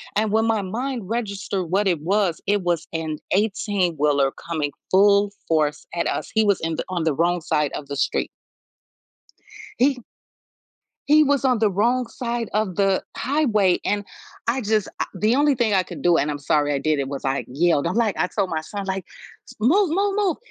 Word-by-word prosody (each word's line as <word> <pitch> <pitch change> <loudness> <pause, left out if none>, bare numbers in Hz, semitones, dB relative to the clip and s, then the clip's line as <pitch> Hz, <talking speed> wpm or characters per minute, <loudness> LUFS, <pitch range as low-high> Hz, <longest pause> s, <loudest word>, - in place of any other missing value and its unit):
and 215 0 +1
when 220 +1 +2
my 225 -2 +1
mind 230 +2 -4
registered 200 -5 -2
what 195 +4 +1
it 175 -5 +1
was, 190 0 0
it 205 0 +2
was 175 -2 -1
an 160 -1 -3
eighteen-wheeler 175 -9 +1 0.2
coming 155 -4 -2 0.2
full 200 +1 +4 0.2
force 155 -2 0
at 170 - -1
us. - - -3
He 220 0 +3
was 200 -2 +2
in 165 0 -2
the - - -3
on 175 -3 -2
the 160 - +1
wrong 175 +4 +1
side 150 -2 0
of 140 - -6
the 140 - -5
street. - - 0 1.5
He 255 -1 +2 1.1
he 305 +1 +6
was 280 -1 +1
on 255 -3 +3
the 215 -1 +2
wrong 235 +6 +1
side 235 -2 -4
of 210 -4 0
the 195 -1 +2
highway 225 - +2
and 205 0 0 0.4
I, 240 +3 +1
just, 215 -2 0
a - - +1
the 215 +6 +2
only 290 +1 +3
thing 230 -4 +1
I 190 - +4
could - - -9
do 175 -1 +4
and 150 - +1
I'm 145 - -4
sorry 145 +1 +1
I 140 - 0
did 155 +1 0
it 135 -1 -2
was, 140 0 -6
like, 135 0 -1
yelled. 155 +2 +1
I'm 180 +6 -1
like 225 -5 +1
I 180 - +1
told 195 -2 -1
my 160 -1 -1
son, 200 +5 -6
like, 190 -1 -3 0.6
"Move 340 - +3
move 395 +3 +1
move." 395 -6 +1
200 Hz, 195 wpm, -23 LUFS, 165-225 Hz, 1.5 s, he